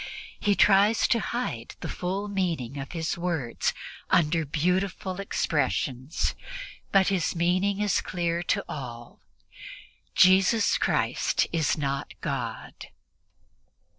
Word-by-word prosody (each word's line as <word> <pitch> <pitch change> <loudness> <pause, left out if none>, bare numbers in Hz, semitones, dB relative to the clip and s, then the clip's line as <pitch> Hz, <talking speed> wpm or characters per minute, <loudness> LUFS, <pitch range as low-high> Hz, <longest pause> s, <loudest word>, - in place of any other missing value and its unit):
He 205 -1 +2
tries 205 +3 +5
to 235 - +3
hide 220 - -4
the - - -4
full 190 +3 -3
meaning 165 - -2
of 135 +4 -7
his 165 0 -2
words 165 -9 -1 0.4
under 160 -1 +2
beautiful 185 +5 -1
expressions, 145 -6 -1 0.6
but 195 -1 +4
his 185 -4 0
meaning 185 +4 +1
is 210 -2 +2
clear 170 -1 -1
to 175 - 0
all 120 -4 -8 1.0
"Jesus 190 +4 +5
Christ - - +1
is 160 -2 +1
not 140 -1 -3
God." 125 -6 -5
175 Hz, 105 wpm, -27 LUFS, 145-195 Hz, 1.0 s, tries